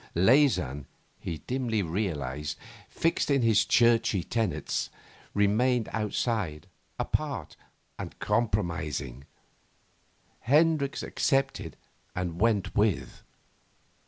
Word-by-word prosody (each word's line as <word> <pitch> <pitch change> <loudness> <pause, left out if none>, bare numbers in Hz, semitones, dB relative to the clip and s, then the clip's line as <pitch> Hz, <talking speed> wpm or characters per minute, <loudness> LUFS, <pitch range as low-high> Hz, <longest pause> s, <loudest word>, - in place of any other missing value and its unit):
Leysin, 90 - +3 0.3
he 80 - -4
dimly 120 -5 0
realised, 75 -6 -3 0.3
fixed 165 -2 0
in 140 -3 +3
his 110 -3 +4
churchy 115 -5 +3
tenets, 115 +3 -1 0.5
remained 110 +4 +2
outside, 105 -7 -1 0.3
apart, 125 - -2 0.4
and - - -7
compromising; 85 - -1 1.1
Hendricks 150 +2 +2
accepted 135 -1 0 0.4
and 90 0 -3
went 105 -4 +2
with. 105 -3 0
105 Hz, 80 wpm, -28 LUFS, 85-125 Hz, 1.1 s, his